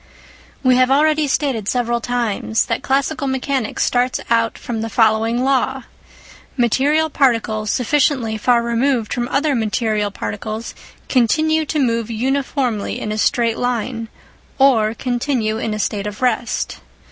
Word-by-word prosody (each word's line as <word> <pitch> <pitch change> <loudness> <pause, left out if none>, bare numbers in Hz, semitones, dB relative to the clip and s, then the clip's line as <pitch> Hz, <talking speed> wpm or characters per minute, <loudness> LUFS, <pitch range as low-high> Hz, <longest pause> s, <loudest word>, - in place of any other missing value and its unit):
We 255 -1 +4
have 255 0 +4
already 305 +2 +3
stated 265 -7 -1
several 240 0 0
times 230 -2 -1
that - - -2
classical 280 +2 0
mechanics 265 -3 -1
starts 250 +1 +1
out 230 -1 +2
from 225 -2 -4
the 225 - -3
following 225 +2 +2
law: 265 0 0 0.7
Material 280 +6 +2
particles 230 -7 +1
sufficiently 255 -2 +1
far 235 +2 +2
removed 235 0 0
from 240 -1 -2
other 290 +3 +1
material 215 -2 0
particles 210 - -5 0.3
continue 310 +5 +2
to 310 - -2
move 230 -5 0
uniformly 255 -1 -1
in 210 - -4
a 215 - -2
straight 230 0 +1
line 240 -1 -2 0.5
or 230 -5 +3
continue 245 -3 -1
in 225 - -2
a 210 - -2
state 210 -1 -2
of 210 +4 -6
rest. 240 -1 -1
240 Hz, 135 wpm, -19 LUFS, 220-270 Hz, 0.7 s, We